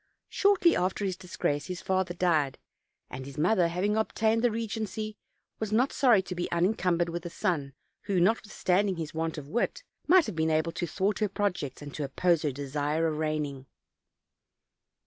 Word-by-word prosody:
Shortly 390 -4 +4
after 185 +3 0
his 190 -2 -1
disgrace 160 -5 -2
his 180 -1 -4
father 190 -2 0
died; 155 -7 +1 0.5
and 130 +1 -6
his 140 +1 -10
mother, 175 +3 +3
hav 175 +2 -3
ing 210 +1 +2
obtained 220 +1 +1
the 245 - +5
regency, 220 -1 -3 0.4
was 220 -1 -3
not 245 +5 +2
sorry 235 -8 +4
to 180 - -5
be 175 0 -3
unincum 180 0 +2
bered 175 0 +1
with 170 0 -4
a 175 - -5
son, 145 -5 -1 0.3
who, 195 -3 +1
notwithstanding 200 -1 +1
his 160 -3 -5
want 160 0 -2
of 145 -2 -7
wit, 240 - -1 0.2
might 355 0 +6
have - - -5
been 160 0 +1
able 160 +1 +1
to 175 - -3
thwart 195 +3 0
her 210 -2 +1
projects, 180 -10 -2
and 145 -1 -8
to 150 - -3
oppose 165 +4 +1
her 150 - 0
desire 145 +3 -1
of 155 -1 -1
reigning. 150 -4 -2
180 Hz, 185 wpm, -29 LUFS, 155-210 Hz, 0.5 s, might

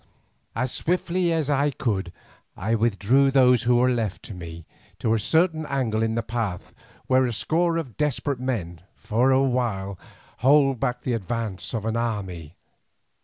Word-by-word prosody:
As 125 +3 -1
swiftly 180 0 0
as 160 -4 0
I 145 0 +2
could 105 -11 -2 0.5
I 110 +5 -1
withdrew 115 +4 +3
those 125 -3 +5
who 125 - +5
were 125 +1 +4
left 110 -6 -2
to - - -8
me 85 -2 -9 0.3
to 110 - 0
a 115 - +2
certain 160 - +2
angle 120 -6 -1
in 115 0 0
the 115 - -1
path, 110 -5 -4 0.3
where 130 0 +3
a - - -2
score 165 +8 +1
of 140 -9 -5
desperate 145 -2 -1
men 110 -10 -3
might, - - -23
for 120 +5 +1
a 135 0 +4
while, 110 -8 -1 0.4
hold 135 -2 +4
back 125 -1 -1
the 125 - -2
advance 115 -1 -3
of 110 -1 -3
an 115 0 -1
army. 95 -9 -3
120 Hz, 170 wpm, -24 LUFS, 105-135 Hz, 0.5 s, those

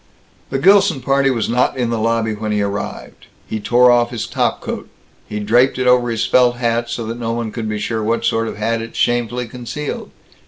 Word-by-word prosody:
The 135 - -1
Gilson 190 0 +4
party 135 +1 +2
was 120 -4 0
not 125 +3 +1
in 120 -2 -1
the 115 - -1
lobby 115 0 0
when 105 0 -4
he 105 -1 +1
arrived. 100 +1 -5 0.2
He 110 - -4
tore 120 +4 +4
off 120 -1 +3
his 120 -3 -4
top - - -1
coat. - - -6 0.4
He 105 - -4
draped 120 +6 +3
it 130 - -1
over 125 -1 +4
his 115 -2 -1
felt 125 -1 +4
hat, 120 -1 -1
so 115 - -4
that 115 +2 -5
no 115 -1 -2
one 115 -2 -3
could 110 -2 -4
be 105 - -2
sure 110 +1 -2
what 115 +2 0
sort 115 0 +1
of - - -6
hat 115 +2 -1
it 115 0 -8
shamefully 120 0 0
concealed. 125 +5 -6
120 Hz, 220 wpm, -18 LUFS, 110-125 Hz, 0.4 s, Gilson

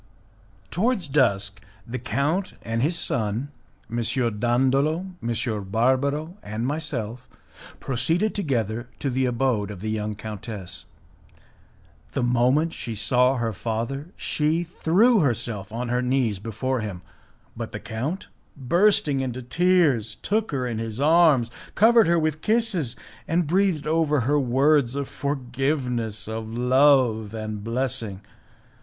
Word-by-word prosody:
Towards 205 -2 +1
dusk, 100 -8 +1 0.2
the 125 +1 -5
count 140 - -1
and 115 0 -2
his 165 +6 +1
son, 115 +1 -1 0.4
M. 115 - -5 0.4
Dandolo, 135 - +2 0.2
M. 115 -2 -2
Barbaro, 140 - 0
and 110 +3 -4
myself, 125 -5 -3 0.5
proceeded 160 - 0
together 120 - -2
to 140 - -2
the 130 +1 +1
abode 120 -4 0
of 100 -3 -7
the 110 +3 -3
young 105 -1 -2
countess. 105 -2 -7 1.3
The - - 0
moment 125 +7 +2
she 115 - -5
saw 125 +5 +3
her 115 -3 -1
father, 115 - -3
she 155 +3 0
threw 190 +7 +3
herself 115 - -1
on 120 +2 -3
her 125 +1 +1
knees 125 -5 +1
before 115 +5 -2
him, 95 -5 -6 0.5
but - - -5
the - - -5
count, 135 - -4 0.3
bursting 150 +1 +3
into 130 -1 -3
tears, 145 - +2
took 215 +2 -1
her 130 -3 -1
in 115 -3 -3
his 115 0 -4
arms, 150 -6 +4 0.2
covered 225 -1 +6
her 170 0 +3
with 155 -1 0
kisses, 215 - +1 0.3
and 170 +1 +1
breathed 175 -2 +1
over 155 -2 +2
her 145 +5 +2
words 135 0 +3
of 140 -1 -2
forgiveness, 125 -5 -2
of 110 0 -5
love 125 -3 +3
and 110 -1 -5
blessing. 115 -4 -2
130 Hz, 130 wpm, -24 LUFS, 115-150 Hz, 1.3 s, covered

